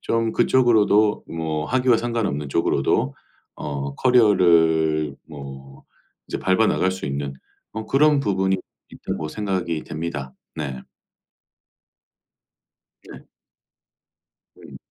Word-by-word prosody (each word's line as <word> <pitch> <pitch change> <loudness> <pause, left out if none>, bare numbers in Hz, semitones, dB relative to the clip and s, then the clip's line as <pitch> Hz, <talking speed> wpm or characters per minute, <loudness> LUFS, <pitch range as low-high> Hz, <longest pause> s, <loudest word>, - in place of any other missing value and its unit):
좀 115 -1 0
그쪽으로도 110 -4 +3
뭐 80 -2 -3
학위와 125 -2 +3
상관없는 110 -12 -2
쪽으로도 70 -2 +1 0.4
어 70 -1 -5
커리어를 80 - +3
뭐 70 -2 -10 0.5
이제 - - -3
밟아 95 +4 +2
나갈 95 - +1
수 95 - -7
있는 70 0 -3 0.4
어 110 0 -5
그런 150 +1 +4
부분이 95 -4 +1 0.3
있다고 75 - -5
생각이 95 -5 -2
됩니다. 75 -4 -5 0.2
네. 70 -5 -5 2.2
네. - - -13 1.3
음. - - -13
85 Hz, 205 characters per minute, -22 LUFS, 75-110 Hz, 2.2 s, 그런